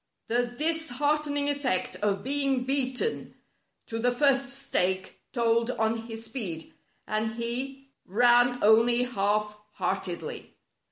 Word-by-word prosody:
The 240 +1 +1
disheartening 295 +1 0
effect 280 -9 0
of 200 -1 -1
being 275 -1 +1
beaten 265 - 0 0.5
to 225 - -5
the 245 +2 +2
first 275 +1 +2
stake 190 -9 -2
told 230 -1 +1
on 225 -1 -1
his 225 0 -7
speed, 205 -9 -5 0.3
and 220 +1 -2
he 265 +4 -3 0.2
ran 245 +4 +4
only 230 +3 +5
half 210 -3 0 0.2
heartedly. 185 -1 -4
240 Hz, 110 wpm, -27 LUFS, 220-270 Hz, 0.5 s, only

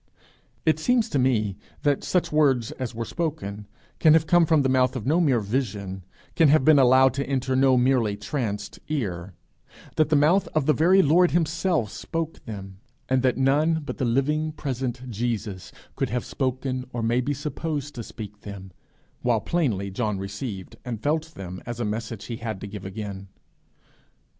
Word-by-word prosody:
It 160 -1 +3
seems 235 +5 +2
to 140 - 0
me 110 -7 +1 0.3
that 145 -2 +2
such 180 - 0
words 135 -7 +3
as 125 -3 -5
were 115 0 -3
spoken 105 - -4 0.3
can 155 -2 +6
have 160 0 +4
come 175 -1 +4
from 155 -3 +4
the - - +2
mouth 130 0 +2
of 120 -4 -4
no 160 +6 +3
mere 135 -8 +3
vision, 100 -4 -3 0.3
can 165 - +5
have 145 -2 +4
been 155 -2 +7
allowed 130 0 +6
to 140 +1 -3
enter 130 -1 0
no 130 -1 +4
merely 125 -5 +2
tranced 105 -2 -4
ear, 95 - -3 0.6
that 155 -1 +3
the 155 - +3
mouth 155 +7 +4
of 155 -3 +2
the 155 - +4
very 180 +7 +5
Lord 175 +5 +5
himself 165 - 0
spoke 165 -1 -4
them, 95 -3 -8 0.3
and 130 0 +3
that 130 -1 +2
none 150 +4 +2
but - - -6
the 130 - +1
living 150 +6 +1
present 130 -3 -4
Jesus 110 -4 -3 0.2
could - - -1
have 120 +2 -2
spoken 130 -1 -2
or 120 -1 -3
may 120 +2 +2
be 145 +3 -1
supposed 150 +1 -4
to 120 - -6
speak 105 -2 -9
them; 95 -2 -9 0.5
while 120 -2 +2
plainly 110 - -1
John 105 0 -1
received 95 0 -6
and 120 -3 -4
felt 155 +5 -1
them 90 -1 -7
as 120 -1 -5
a 120 - -1
message 110 0 -4
he 115 - -5
had 110 -4 -5
to 105 - -5
give 100 -1 -8
again. 100 -1 -6
130 Hz, 180 wpm, -25 LUFS, 105-150 Hz, 0.6 s, been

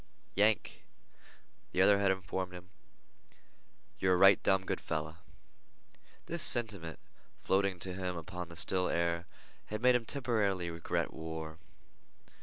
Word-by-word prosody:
"Yank," 105 +2 +1 0.9
the - - 0
other 100 +1 +6
had 100 -1 +3
informed 95 -1 -2
him, 90 +1 -11 1.3
"yer 95 -1 +3
a - - +4
right 95 +1 +7
dum 95 -1 +2
good - - -2
feller." 80 +1 -3 1.1
This 170 0 -4
sentiment, 105 -12 -1 0.4
floating 95 -1 +1
to 90 +2 -4
him 90 -1 -3
upon 90 +1 -6
the 85 - -10
still 90 +2 0
air, 85 0 0 0.4
had 110 +2 -5
made 125 0 +7
him 120 -2 +1
temporarily 105 - 0
regret 85 -1 -2
war. 80 0 -6
95 Hz, 130 wpm, -33 LUFS, 85-100 Hz, 1.3 s, right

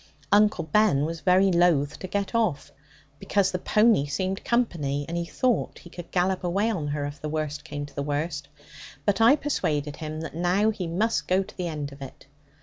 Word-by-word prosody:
Uncle 210 -4 +4
Ben 155 -3 +3
was 165 0 -5
very 185 +3 +4
loath 170 -5 +2
to 185 - -6
get 200 +3 -2
off, 215 -11 0 0.5
because 200 -2 +1
the 180 - -2
pony 210 -7 +3
seemed 185 +7 -2
company, 150 - 0
and 170 - -4
he 170 0 -1
thought 245 +5 0
he 175 - -14
could 175 -1 -9
gallop 185 +1 0
away 195 +6 +1
on 160 -9 -3
her, 145 0 -2
if 145 0 -7
the 150 - -3
worst 150 -1 -3
came 145 -2 -5
to 145 - -14
the 140 - -3
worst, 145 0 -3 0.6
but 205 +1 +1
I 235 +5 +7
persuaded 150 - -2
him 155 0 -5
that 165 - -6
now 180 +6 +2
he 185 -5 -4
must 210 +7 0
go 185 +1 +2
to 205 - -15
the 180 -2 -3
end 150 -3 -4
of 140 0 -13
it. 135 0 -10
170 Hz, 205 wpm, -26 LUFS, 150-200 Hz, 0.6 s, I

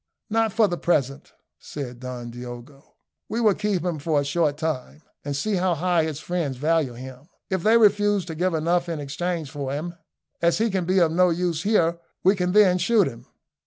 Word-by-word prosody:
"Not 225 0 +2
for 220 +1 +3
the 175 -2 -3
present," 140 -5 -1 0.3
said 125 -4 -7
Don 125 -2 -7
Diogo. 120 +4 -10 0.3
"We 225 - -2
will 215 -3 +4
keep 200 -4 -1
him 170 -4 -2
for 150 0 +1
a 145 - -1
short 145 0 0
time, 155 -1 -4 0.2
and 145 -1 -3
see 200 +8 -1
how 180 -1 +1
high 170 0 +1
his 155 -2 -4
friends 165 -8 -3
value 155 -2 +1
him. 130 +5 -11 0.2
If 190 -2 0
they 220 +5 +5
refuse 205 -3 +3
to 165 - -6
give 175 +2 0
enough 170 +2 0
in 165 -2 -3
exchange 155 +1 -3
for 140 -3 -4
him, 155 +5 -4 0.5
as 170 0 +3
he 225 0 +1
can 190 -2 -1
be 185 +2 +1
of 170 -3 +4
no 180 +2 +4
use 170 -2 -1
here, 170 -4 +2 0.2
we 190 +3 +5
can 180 -1 -1
then 195 -3 +5
shoot 205 +2 +3
him!" 120 -2 -9
170 Hz, 200 wpm, -24 LUFS, 145-185 Hz, 0.5 s, they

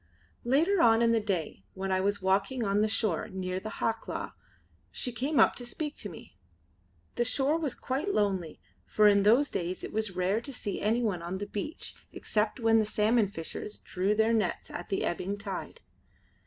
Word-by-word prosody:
Later 325 +10 +3
on 225 0 +5
in 230 - +4
the 230 - +3
day, 180 - -3
when 190 0 -3
I 185 0 +2
was 200 0 0
walking 200 +6 +1
on 200 0 +2
the 215 - +3
shore 215 -5 0
near 185 -2 -3
the 215 - -6
Hawklaw, 225 0 -3 0.6
she 250 - -2
came 270 +6 0
up - - +6
to 245 - -5
speak 295 +5 -5
to - - -3
me. - - -13 0.8
The 240 - +3
shore 270 +5 +1
was 295 -6 -2
quite 280 +10 -2
lonely, 190 - 0 0.2
for 210 0 +4
in 200 -1 +5
those 235 +8 +4
days 180 +1 -3
it - - -6
was 215 -3 -1
rare 185 +5 +1
to 280 - -7
see 210 -6 -4
anyone 215 -4 +1
on 175 +3 -4
the 205 - -4
beach 255 - -5 0.2
except 210 +4 -1
when 225 -1 +4
the 215 - +2
salmon 215 +1 +3
fishers 190 +3 -6
drew 190 +3 -1
their 220 +1 +3
nets 210 -6 -1
at 175 - -6
the 195 - 0
ebbing 190 +3 -2
tide. 200 - -6
210 Hz, 190 wpm, -29 LUFS, 190-240 Hz, 0.8 s, up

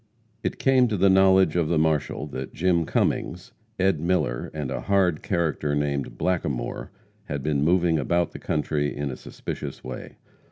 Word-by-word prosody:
It - - -2
came 130 -2 +4
to 110 -3 -1
the 95 +1 +5
knowledge 95 -3 +5
of 85 -3 +2
the 85 0 +1
marshal 75 -2 0
that 65 -1 -6
Jim 85 -2 +2
Cummings, 90 +3 -1 0.3
Ed. 95 -4 +2
Miller, 85 -7 0
and 75 -4 -4
a - - -3
hard 95 -5 +2
character 80 -6 -1
named 70 -1 -2
Blackamore, 80 -8 -2 0.4
had 70 -2 -4
been 75 -1 0
moving 85 -1 +3
about 85 +5 +1
the - - -9
country 75 -1 -1
in 70 -1 -2
a - - -5
suspicious - - -7
way. 65 0 -8
80 Hz, 165 wpm, -25 LUFS, 75-90 Hz, 0.4 s, the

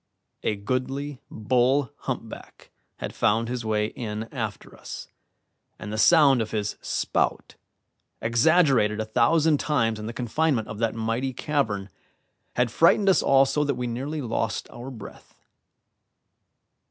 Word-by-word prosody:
A 105 - 0
goodly 130 +6 -3
bull 125 +3 +1
humpback - - -7 0.3
had - - -5
found 115 +2 +1
his 125 0 -3
way 105 -1 0
in 110 -1 -5
after 110 -6 -5
us, - - -8 0.7
and 105 - -7
the - - -3
sound 140 -4 +6
of 110 - -3
his 105 -1 -2
spout, - - -1 0.7
exaggerated 120 -2 +3
a 110 - -1
thousand 155 +7 +3
times 115 -7 0
in 105 - -6
the - - -3
confinement 125 +1 0
of 105 - -7
that 115 -1 0
mighty 115 +4 -2
cavern, 110 -9 -2 0.6
had 125 -2 +1
frightened 195 - +4
us 190 - +4
all 135 0 +5
so 150 +2 0
that 140 -2 0
we 125 0 -3
nearly 135 +6 -3
lost 115 -2 -2
our 120 +3 -8
breath. 110 -6 -12
120 Hz, 140 wpm, -25 LUFS, 110-140 Hz, 0.7 s, sound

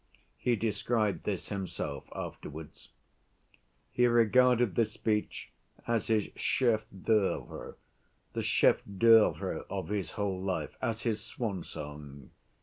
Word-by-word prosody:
He 120 - +2
described 110 0 0
this 95 -4 -3
himself 95 -8 -4
afterwards. 75 +1 -8 1.0
He 125 0 +3
regarded 120 0 +4
this 110 -2 +1
speech 105 -2 -2 0.3
as 115 -2 0
his 110 -2 +1
chef‐d'œuvre, 110 -4 0 0.6
the - - -2
chef‐d'œuvre 110 +2 +3
of - - -4
his 100 -3 -2
whole 100 -3 -2
life, 95 -1 -2
as 115 -3 -2
his 110 -3 0
swan‐song. 75 - -6
105 Hz, 100 wpm, -31 LUFS, 95-115 Hz, 1.0 s, regarded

